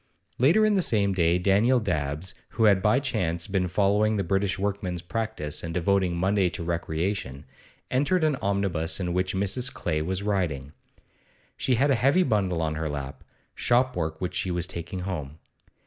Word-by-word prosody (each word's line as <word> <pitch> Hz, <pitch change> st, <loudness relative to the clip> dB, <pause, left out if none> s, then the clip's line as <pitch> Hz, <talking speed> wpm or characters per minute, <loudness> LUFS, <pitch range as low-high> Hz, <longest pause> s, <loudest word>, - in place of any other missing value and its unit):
Later 165 Hz, -, +5 dB
in 215 Hz, -, +3 dB
the 195 Hz, -, +3 dB
same 100 Hz, -, +2 dB
day 85 Hz, -1 st, +2 dB
Daniel 105 Hz, +8 st, +3 dB
Dabbs, 80 Hz, -3 st, -3 dB, 0.2 s
who 115 Hz, -, +2 dB
had 100 Hz, -3 st, +5 dB
by 105 Hz, +6 st, +3 dB
chance 85 Hz, -, -1 dB
been 95 Hz, -3 st, 0 dB
following 105 Hz, +3 st, +2 dB
the 100 Hz, -, 0 dB
British 95 Hz, +2 st, 0 dB
workman's 95 Hz, -3 st, -3 dB
practice 105 Hz, -7 st, -3 dB
and 85 Hz, -1 st, -5 dB
devoting 90 Hz, 0 st, +1 dB
Monday 95 Hz, +1 st, +2 dB
to 85 Hz, -, -6 dB
recreation, 85 Hz, -3 st, -3 dB, 0.5 s
entered 145 Hz, +7 st, +2 dB
an 155 Hz, -2 st, +2 dB
omnibus 100 Hz, -5 st, -1 dB
in 90 Hz, -2 st, -2 dB
which 90 Hz, +1 st, -1 dB
Mrs. 100 Hz, +6 st, 0 dB
Clay 75 Hz, 0 st, -2 dB
was 95 Hz, +4 st, -2 dB
riding. 80 Hz, -9 st, -2 dB, 0.8 s
She 130 Hz, -, +1 dB
had 140 Hz, +5 st, +2 dB
a 130 Hz, -, +1 dB
heavy 145 Hz, +8 st, +4 dB
bundle 95 Hz, -, 0 dB
on 80 Hz, -1 st, -1 dB
her 80 Hz, 0 st, -3 dB
lap, 70 Hz, -2 st, -6 dB, 0.3 s
shopwork 120 Hz, -11 st, 0 dB
which 90 Hz, -1 st, -3 dB
she 90 Hz, -, -1 dB
was 85 Hz, -1 st, -1 dB
taking 85 Hz, +1 st, -6 dB
home. 80 Hz, -6 st, -5 dB
95 Hz, 170 wpm, -26 LUFS, 85-105 Hz, 0.8 s, Later